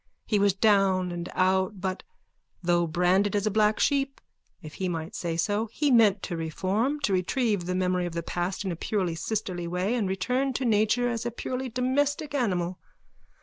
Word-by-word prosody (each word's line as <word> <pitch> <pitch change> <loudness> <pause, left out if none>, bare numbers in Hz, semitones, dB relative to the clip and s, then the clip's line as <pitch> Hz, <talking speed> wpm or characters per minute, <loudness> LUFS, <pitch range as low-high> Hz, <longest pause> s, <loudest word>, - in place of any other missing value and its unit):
He 210 - +1
was 200 -1 +4
down 195 -3 +3
and 175 0 -5
out 190 +1 +1
but, 190 0 -3 0.6
though 175 0 +2
branded 180 +5 +2
as 205 0 +1
a 215 - +1
black 215 +1 +2
sheep, 275 -1 +1 0.4
if 155 -1 -10
he 185 - 0
might 165 -1 -4
say 165 -2 -3
so, 205 +6 0
he 295 +3 +1
meant 210 -5 +5
to 175 - -3
reform, 190 - -1
to 205 - +1
retrieve 200 +1 0
the 180 - -1
memory 180 -1 0
of 170 - -7
the 170 0 -3
past 180 +4 -3
in 190 - -1
a - - -3
purely 185 0 -1
sisterly 175 -1 -3
way 180 +5 -1
and 220 -6 0
return 250 +8 0
to 255 +1 -2
nature 220 +2 +2
as 235 -1 -2
a 240 - -1
purely 255 +2 -4
domestic 280 +4 0
animal. 185 -9 -1
195 Hz, 190 wpm, -27 LUFS, 180-235 Hz, 0.6 s, meant